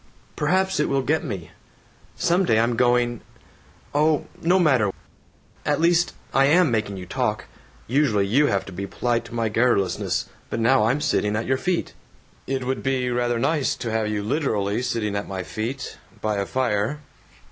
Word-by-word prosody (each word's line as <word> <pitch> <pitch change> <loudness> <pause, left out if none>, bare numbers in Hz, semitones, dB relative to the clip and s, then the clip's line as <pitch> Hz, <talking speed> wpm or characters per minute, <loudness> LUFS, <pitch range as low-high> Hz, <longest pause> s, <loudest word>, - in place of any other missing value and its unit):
Perhaps 190 +4 +1
it 150 - +1
will 135 -1 +1
get 160 +5 +1
me. 95 - -6 0.6
Some 175 +3 +2
day 110 -11 +3
I'm 115 +1 +2
going 120 -1 +2 0.7
Oh, 150 0 +2 0.2
no 175 +3 +3
matter. 130 - +3 0.7
At - - +1
least, 170 +1 +3 0.2
I 135 0 +5
am 160 0 +4
making 110 -3 -1
you 90 - -7
talk! - - -2 0.4
Usually 120 -6 +2
you 140 +9 +3
have 100 -5 0
to - - -9
be 95 +2 -5
polite 120 +3 -1
to 120 - -9
my 115 -1 +1
garrulousness, 110 -4 +1 0.2
but - - -3
now 115 0 +4
I'm 130 +6 +1
sitting 105 -6 +1
at 115 - -1
your 130 +1 +1
feet." 180 +5 -1 0.5
"It 135 -1 -1
would 130 +1 -2
be 130 -2 0
rather 120 0 0
nice 140 +3 +1
to 115 - -4
have 110 -1 0
you 105 -1 -2
literally 110 -4 0
sitting 110 -4 -1
at 100 - -3
my 95 -1 -4
feet, 120 +8 -5 0.2
by 105 -1 -1
a 100 -1 -1
fire." 125 +2 0
120 Hz, 175 wpm, -23 LUFS, 105-145 Hz, 0.7 s, I